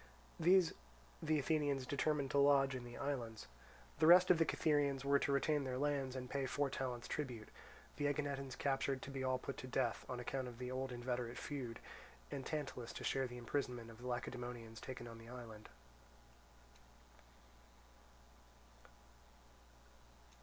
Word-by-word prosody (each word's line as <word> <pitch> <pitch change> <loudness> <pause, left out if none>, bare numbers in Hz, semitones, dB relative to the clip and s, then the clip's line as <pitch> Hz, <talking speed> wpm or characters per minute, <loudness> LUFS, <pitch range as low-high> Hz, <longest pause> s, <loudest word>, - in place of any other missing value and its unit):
These 175 +1 +5 0.5
the 155 -1 +2
Athenians 145 -3 +1
determined 140 +1 0
to 140 - +3
lodge 140 -1 +5
in 130 -1 -4
the 120 0 -8
islands: 120 -6 -3 0.5
the 155 - +5
rest 180 +2 +9
of 170 - +5
the 165 - +5
Cytherians 145 -4 +2
were 140 0 +5
to 140 - +1
retain 145 +1 +2
their 130 -1 -2
lands 140 -2 0
and 125 -1 -4
pay 135 +1 -1
four 140 +1 0
talents 125 -2 -3
tribute; 125 -8 -4 0.5
the 145 - +1
Aeginetans 140 -2 -1
captured 135 -1 0
to 140 - -6
be 135 -1 -3
all 130 0 +2
put 135 +1 -6
to 130 - -6
death, 120 -4 0
on 125 - -3
account 130 +1 -2
of 120 -1 -8
the 125 +1 -4
old 130 0 -2
inveterate 120 -1 -2
feud; 125 -6 -4 0.5
and 140 -2 -3
Tantalus 135 -6 -3
to - - -6
share 135 -1 +1
the 125 0 -8
imprisonment 120 -1 -2
of 115 - -14
the 125 - -5
Lacedaemonians 120 -2 -4
taken 130 -2 -6
on 115 -1 -9
the 115 0 -11
island. 115 -3 -9
130 Hz, 155 wpm, -39 LUFS, 125-145 Hz, 0.5 s, rest